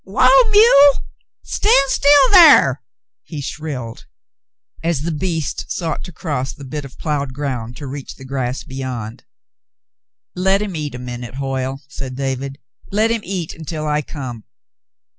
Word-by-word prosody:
"Whoa, 255 - +4
mule. 410 -10 +7 0.5
Stand 275 -11 +2
still 285 -1 +5
thar," 345 -6 +7 0.4
he 155 - -8
shrilled, 140 -5 -6 0.8
as 165 -4 0
the 170 +3 -2
beast 160 -2 -3
sought 165 -4 -3
to 180 - -9
cross 145 -6 -3
the 140 - -12
bit 150 +2 -5
of 135 - -13
ploughed 140 -4 -3
ground 125 -5 -4
to 145 - -7
reach 140 0 -7
the 130 - -12
grass 130 -1 -3
beyond. 130 -5 -6 1.1
"Let 190 +2 +2
him 200 -4 -5
eat 150 -4 -4
a - - -5
minute, 125 0 -7
Hoyle," 135 0 -3
said 135 -2 -7
David. 135 0 -3 0.3
"Let 215 +3 +2
him 230 -1 0
eat 180 -4 -4
until 160 -1 -6
I 150 0 +1
come. 130 -7 -8
145 Hz, 145 wpm, -19 LUFS, 130-185 Hz, 1.1 s, mule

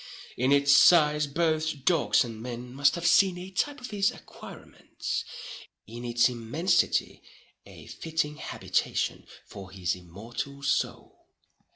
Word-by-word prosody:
In 130 +3 +1
its 140 0 +5
size 150 -2 +5
both 155 -2 -1
dogs 165 -6 +3
and 115 -3 -8
men 125 +1 -7
must 140 +1 +3
have 170 0 -5
seen 190 -1 +4
a 185 +2 -8
type 290 +10 -2
of 250 -1 -9
his 200 -1 +2
acquirements—in 120 +2 -9
its 120 0 +3
immensity 145 +9 0 0.5
a - - -13
fitting 155 -2 -3
habitation - - -2 0.2
for 95 -1 -11
his 95 -2 -2
immortal 110 +10 -8
soul. 140 - -2
140 Hz, 125 wpm, -27 LUFS, 120-165 Hz, 0.5 s, its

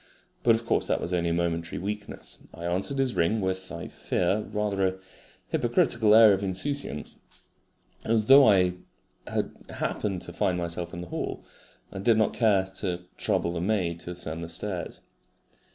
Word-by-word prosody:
But 115 -2 +5
of 115 +1 -4
course - - +1
that - - +1
was 90 - -4
only 85 -1 +1
a - - 0
momentary 85 -1 -1
weakness. 105 +2 -6 0.2
I 85 - -7
answered 95 +10 -1
his 135 -2 +1
ring 85 +7 +1
with, 95 -1 -3
I 85 - -6
fear, 95 +4 -1
rather 100 -2 0
a 95 - -2 0.5
hypocritical 110 -2 +3
air 110 -2 +8
of 95 - -1
insouciance, 95 - -2 0.8
as 110 -1 +2
though 135 0 +8
I 90 -3 +4 0.5
had - - -2 0.2
happened 95 -4 -3
to - - -8
find 90 -1 0
myself 85 0 -3
in 85 - -5
the 90 - -8
hall, - - -4 0.5
and 95 - -6
did 115 0 +4
not 110 -2 +2
care 105 -5 +3
to 90 -3 -2
trouble 85 - 0
the 85 - -3
maid 90 -4 0
to 85 - -7
ascend 85 -2 -4
the 85 - -7
stairs. 90 +1 -4
95 Hz, 170 wpm, -27 LUFS, 85-110 Hz, 0.8 s, air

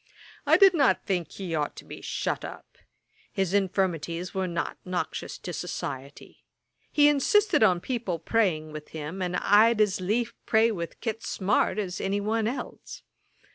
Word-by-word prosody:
I - - +6
did 390 -2 +7
not 285 -6 +2
think 180 -4 -1
he 185 -4 -6
ought 150 -2 -1
to - - -11
be - - -9
shut - - -2
up. - - -10 0.5
His 190 -2 -1
infirmities 180 -3 0
were 190 -1 -1
not 170 -1 -3
noxious 180 -1 -4
to 175 - -7
society. 140 -5 -6 0.5
He 290 -1 +5
insisted 355 - +3
on 185 -5 +5
people 230 -8 -2
praying 165 -4 0
with 150 0 -8
him; 155 +5 -5
and 180 0 -1
I'd 215 +2 +5
as 205 -3 +2
lief 225 +5 0
pray 225 +1 +4
with 170 -5 -5
Kit 225 -1 -3
Smart 195 -1 0
as 190 -4 -3
any 195 +1 0
one 215 +2 0
else. 250 +4 -6
195 Hz, 160 wpm, -27 LUFS, 175-225 Hz, 0.5 s, did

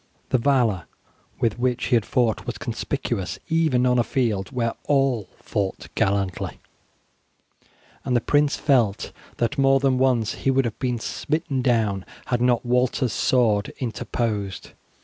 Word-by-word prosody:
The 130 - +2
valour 115 - +2 0.5
with 115 0 0
which 125 0 0
he 125 - +2
had 110 -5 +1
fought 120 -4 0
was - - -3
conspicuous 95 -2 -3
even 155 -6 +2
on 125 -1 +3
a - - +4
field 110 -5 -1
where 115 -3 -1
all 135 -7 +1
fought 100 -3 -3
gallantly, 100 -2 -1 1.4
and 125 -2 0
the - - +5
prince 145 +4 +2
felt 120 -9 +1 0.3
that 120 +4 -1
more 135 0 +5
than 135 -1 +2
once 125 -5 +2
he - - +1
would 135 0 +3
have 115 - -4
been 125 -3 -1
smitten 150 +3 -2
down 110 -6 +1 0.2
had 120 -2 -1
not 125 -1 +2
Walter's 125 -1 +1
sword 110 -5 +2
interposed. 110 -5 -3
120 Hz, 145 wpm, -24 LUFS, 110-130 Hz, 1.4 s, the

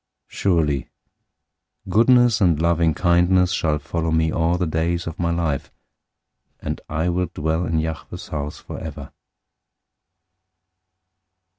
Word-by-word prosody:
023:006 - - -14
Surely 75 -8 +1 1.0
goodness 120 0 +4
and 85 -5 +3
loving 85 -1 +2
kindness 90 +1 +3
shall 75 -2 +1
follow 80 +3 -3
me 80 0 +2
all 85 +2 +1
the 90 - 0
days 85 +2 -1
of 80 - -6
my 85 -1 0
life, 85 -5 -1 0.9
and - - -4
I 80 +3 -1
will 90 +1 0
dwell 80 +2 -1
in 80 - 0
Yahweh's 80 0 -4
house 75 0 -4
forever. - - -8
85 Hz, 120 wpm, -22 LUFS, 80-90 Hz, 1.0 s, goodness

